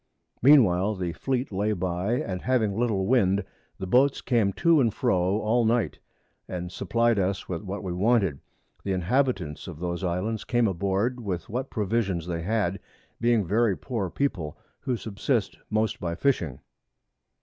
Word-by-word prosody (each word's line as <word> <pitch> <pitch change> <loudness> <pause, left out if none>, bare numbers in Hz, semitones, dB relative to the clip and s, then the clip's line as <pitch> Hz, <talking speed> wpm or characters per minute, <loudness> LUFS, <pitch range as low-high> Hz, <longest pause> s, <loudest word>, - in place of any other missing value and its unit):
Mean 140 +1 +8
while 95 +2 +1
the 90 -3 -3
Fleet 130 - -2
lay 105 +2 0
by, 90 +3 -1
and 95 -6 -2
having 115 -6 +1
little 110 -4 0
Wind, 100 -4 +3 0.3
the 95 - -5
Boats 130 +8 +3
came 115 -6 +1
to 170 -3 +4
and 115 -3 +3
fro 95 +1 +1
all 115 +3 +2
Night, 115 0 +1 0.5
and 90 -1 -5
supply'd 115 +3 +1
us 95 0 -1
with 85 -3 -3
what 100 0 -5
we 90 -2 -3
wanted. 95 - +2 0.4
The 100 - -1
Inhabitants 95 - 0
of 85 -4 -7
those 85 +1 -3
Islands 95 +5 -1
came 120 -2 +2
aboard 100 +6 0
with 95 -7 -4
what 130 +4 -3
Provisions 100 -5 -1
they 85 -2 -3
had, 100 -1 0 0.4
being 115 -3 +2
very 105 +1 +2
poor 110 -8 -3
People, 90 - -2 0.2
who 125 -2 -2
subsist 110 -1 -2
most 110 +1 0
by 85 -1 -3
Fishing. 90 - 0
100 Hz, 160 wpm, -26 LUFS, 90-120 Hz, 0.5 s, Mean